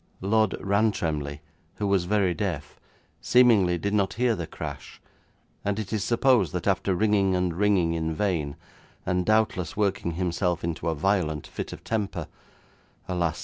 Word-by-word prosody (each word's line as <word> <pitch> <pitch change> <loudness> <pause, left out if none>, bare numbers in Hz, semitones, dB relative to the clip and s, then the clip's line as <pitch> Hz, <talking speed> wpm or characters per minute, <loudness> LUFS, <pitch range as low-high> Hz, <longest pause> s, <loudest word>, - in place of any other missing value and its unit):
Lord 110 +1 +2
Rantremly, 80 -8 0 0.3
who 105 - -3
was 100 -3 +2
very 100 -2 +2
deaf, - - -4 0.4
seemingly 110 -8 +4
did 100 +4 -2
not 100 -2 +1
hear 120 0 +2
the 85 -4 -5
crash, - - -8 0.6
and 100 0 -1
it 110 -1 -4
is 105 -2 0
supposed 115 - +3
that 90 -1 -3
after 95 -1 +1
ringing 100 -2 +2
and 90 -1 0
ringing 95 -4 +2
in 80 -1 -1
vain, 80 -7 -1 0.5
and 90 -1 0
doubtless 110 -6 +1
working 100 -4 0
himself 90 0 -1
into 85 0 -2
a 80 - -1
violent 80 -3 0
fit - - -6
of - - -9
temper 100 -6 -2 0.8
alas! 85 -4 -1
95 Hz, 150 wpm, -26 LUFS, 85-105 Hz, 0.8 s, seemingly